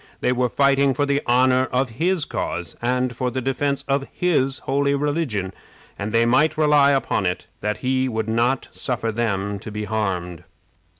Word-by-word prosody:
They - - +1
were 125 0 +1
fighting 140 0 +3
for 145 - +1
the 140 0 +1
honor 130 +1 +4
of 130 +1 +1
his 180 -3 +2
cause - - -4
and 125 +1 0
for 125 +1 -1
the 125 +2 -3
defense 135 +2 -1
of 140 0 0
his 145 -6 +1
holy 140 +1 +1
religion, 140 - -1 0.4
and 105 +2 -4
they 115 +1 +3
might 150 +6 +3
rely 150 -2 +5
upon 135 -8 +1
it 90 - -3
that 105 0 -2
he 130 0 +1
would 110 -2 -2
not 120 +4 +1
suffer 120 -3 -2
them 100 -3 -2
to 110 - -8
be 105 0 -4
harmed. 90 -5 -3
125 Hz, 175 wpm, -22 LUFS, 110-140 Hz, 0.4 s, rely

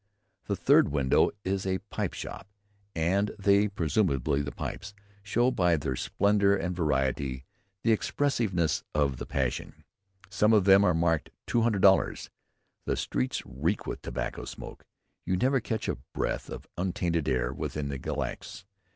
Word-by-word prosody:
Every 100 - 0
third 90 - +5
window 70 -2 +3
is 95 0 -1
a 95 0 +1
pipe - - -2
shop, - - -7 0.5
and 95 +6 +1
they 100 +1 +4
[presumably 80 - 0
the 70 0 -4
pipes] 100 0 -6 0.3
show, 120 +5 +2
by 90 -8 +2
their 65 -3 -2
splendour 100 +6 +2
and 90 -2 -2
variety, 65 -4 -1 0.4
the 115 - +3
expensiveness 110 - 0
of 70 -3 +1
the - - -6
passion. 65 -3 -3 0.4
Some 105 +3 +2
of 105 -4 +4
them 100 0 +7
are 90 -5 +3
marked 80 -2 +1 0.2
'200 115 -4 +1
dollars.' 95 -1 +3 0.5
The - - -1
streets 65 +2 -2
reek 80 +11 -2
with - - -5
tobacco - - -4
smoke. - - -9 0.4
You 90 - 0
never 130 +6 +2
catch 110 -2 -3
a - - -2 0.2
breath - - -2
of - - -7
untainted 90 -4 0
air 65 0 0
within 70 +1 -4
the 70 -1 -4
Glacis. 80 - -5
90 Hz, 150 wpm, -28 LUFS, 70-100 Hz, 0.5 s, them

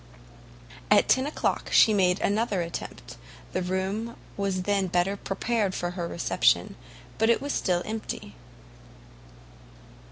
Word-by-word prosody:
At - - +5
10 260 +2 +3
o'clock 300 - -1
she 220 - +6
made 185 -2 +3
another 205 -3 +1
attempt: 170 - -7 0.3
the - - -1
room 190 +5 -2 0.2
was 195 -2 -1
then 200 -1 +1
better 180 +2 +1
prepared 200 0 -1
for 175 0 -2
her 175 -2 -4
reception, 170 - +1 0.4
but 225 - +3 0.2
still 180 -8 0
it - - -6
was - - -14
empty. 220 - -6
195 Hz, 125 wpm, -27 LUFS, 180-215 Hz, 0.4 s, she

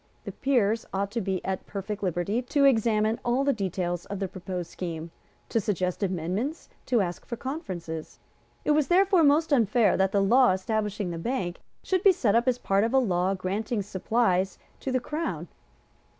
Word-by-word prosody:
The - - -5
Peers 230 -5 +1
ought 200 +1 -2
to 230 - -2
be 190 -2 -2
at 190 -1 -3
perfect 205 +1 -5
liberty 185 +5 0
to 280 +3 +2
examine 220 -3 +3
all 245 +3 +1
the 280 0 +2
details 180 -4 -3
of 200 - -4
the 195 0 -2
proposed 180 -2 -6
scheme, 165 -2 -5 0.4
to 230 - +1
suggest 185 -4 -1
amendments, 190 - -2 0.2
to 240 -4 +3
ask 175 -2 -3
for 240 - -5
conferences. 185 - -6 0.5
It - - +3
was 295 -1 +3
therefore 375 -1 +4
most 300 +2 +4
unfair 230 -3 +3
that 190 0 +2
the 200 0 +2
law 245 +2 +5
establishing 210 -1 -2
the 165 - -5
Bank 185 -4 -2 0.2
should 370 -2 0
be 390 -1 +6
sent 225 - +1
up 235 +2 +2
as 250 -1 +3
part 195 -4 +1
of 230 +4 0
a - - +6
law 190 -6 +2
granting 205 +4 -2
supplies 190 -1 0 0.2
to 265 - -3
the 255 - +2
Crown. 305 +6 -4
210 Hz, 180 wpm, -27 LUFS, 185-250 Hz, 0.5 s, be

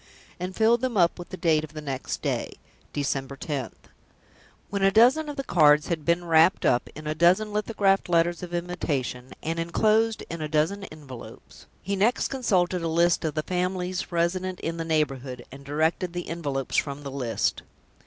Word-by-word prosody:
and 185 +1 -4
filled 230 +2 +3
them 255 -4 -1
up 175 0 +3
with 175 - -8
the 185 - -7
date 160 -4 +2
of 155 -1 -9
the 155 - -6
next 135 -3 -4
day, - - -2 0.4
"December 140 -1 -2
10th." 140 -2 -5 0.9
When 200 -1 -1
a 195 - +5
dozen 255 +9 +4
of 290 - -5
the 275 - -3
cards 150 - +4
had 165 -3 -2
been 170 +1 +1
wrapped 165 +2 +4
up 120 - +2
in 155 +1 -9
a 155 - -1
dozen 185 +6 +3
lithographed 205 -3 +1
letters 170 0 +2
of 180 -1 -7
invitation, 150 -8 -3
and 165 +1 -2
inclosed 215 +6 +2
in 170 -1 -6
a 155 - -2
dozen 165 +7 0
envelopes, 140 - -12 0.2
he 200 +2 -1
next 215 +6 +2
consulted 185 -9 +1
a 165 - -1
list 170 +1 +2
of 155 -2 -2
the 155 - -1
families 180 +1 -2
resident 180 +2 -1
in 165 +1 -3
the 165 - -2
neighborhood, 135 -6 -1
and 140 +1 -11
directed 160 +5 0
the 175 0 -4
envelopes 145 -6 -2
from 140 0 -1
the 140 - -6
list. 125 -4 -1
170 Hz, 185 wpm, -26 LUFS, 150-185 Hz, 0.9 s, a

